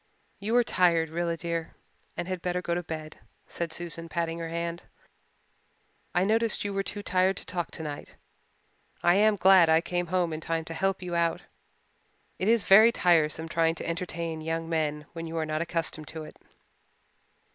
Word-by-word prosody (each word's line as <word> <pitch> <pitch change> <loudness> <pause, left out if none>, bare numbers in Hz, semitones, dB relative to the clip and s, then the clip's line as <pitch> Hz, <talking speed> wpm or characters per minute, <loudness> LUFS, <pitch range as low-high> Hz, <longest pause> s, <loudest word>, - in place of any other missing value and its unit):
"You 215 +4 -1
are 245 - +6
tired, 170 -6 +2
Rilla 170 0 -1
dear, 165 -1 -4 0.4
and 175 - -3
had 185 -2 -3
better 180 0 -1
go 170 -1 -2
to 175 - -1
bed," 155 -2 -7 0.3
Susan 170 0 -4
said, 165 0 -6
patting 165 +1 -2
her 165 -1 -4
hand. 170 +1 -4 1.3
"I 180 - +4
noticed 220 +1 +1
you 200 - -2
were 195 - 0
too 205 +1 -6
tired 185 0 +2
to - - -7
talk 175 -2 -3
tonight. 150 -3 -7 0.9
I 175 - +5
am 210 +2 +4
glad 190 -3 +6
I 160 0 +6
came 175 +1 -2
home 175 -1 0
in 155 - -5
time 165 0 -2
to 165 - -6
help 195 +2 -1
you 175 -1 -5
out. 170 -1 0 1.0
It 190 - -1
is 230 -2 +4
very 215 +5 +8
tiresome 165 -5 +2
trying 165 0 +1
to - - -5
entertain 170 -1 -3
young 165 +1 -3
men 155 -2 -1
when 165 -1 -6
you 165 +1 -5
are 160 - 0
not 155 0 -2
accustomed 165 -2 -2
to 160 -1 -7
it." - - -11
170 Hz, 180 wpm, -28 LUFS, 165-185 Hz, 1.3 s, very